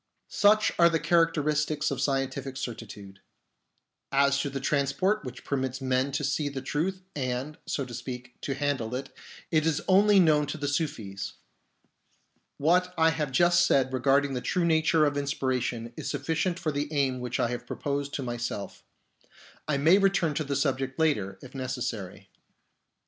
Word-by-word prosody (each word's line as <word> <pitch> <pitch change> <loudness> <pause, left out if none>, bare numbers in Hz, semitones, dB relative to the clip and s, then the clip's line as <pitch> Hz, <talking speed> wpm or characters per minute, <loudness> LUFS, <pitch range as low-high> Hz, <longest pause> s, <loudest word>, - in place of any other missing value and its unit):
Such 210 +1 +4
are 170 0 +7
the 165 -1 +1
characteristics 155 -2 +1
of 135 -1 -2
scientific 135 -1 -1
certi 120 -5 -5
tude. 100 -1 -11 0.9
As 140 0 +3
to 140 - -1
the 135 0 -4
transport 150 +10 +1
which 125 -1 -8
permits 130 -2 -2
men 130 +1 0
to - - -1
see 150 -2 0
the 135 -2 -6
truth 185 +7 -2
and, 130 +2 -3
so 140 - -2
to 125 - -10
speak, 125 0 -7
to 135 - -3
handle 135 -5 -1
it, 135 +1 -6 0.4
it 155 -2 +3
is 155 -2 +1
only 200 +1 +6
known 150 -4 +4
to 145 - -4
the 145 -1 -3
Sufis. 120 - -3 1.2
What 180 +4 +2
I 160 0 +5
have 150 -3 -2
just 175 +5 +4
said 135 -6 +2
regarding 135 +2 +2
the 125 - -2
true 180 +5 0
nature 160 -1 +3
of 145 -1 0
inspiration 130 -4 -2
is - - -5
sufficient 160 +5 -1
for 165 -4 -2
the 145 +1 -3
aim 135 -4 0
which 125 0 -3
I 120 - +1
have 120 0 -5
proposed 140 0 -3
to 140 - -3
myself. 120 -4 -5 0.8
I 150 -2 +1
may 165 +8 +5
return 195 -5 +2
to 155 - -1
the 140 -1 -3
subject 135 -1 -1
later, 105 -12 +1
if 130 - -11
necessary. 110 -7 -5
140 Hz, 165 wpm, -28 LUFS, 130-155 Hz, 1.2 s, are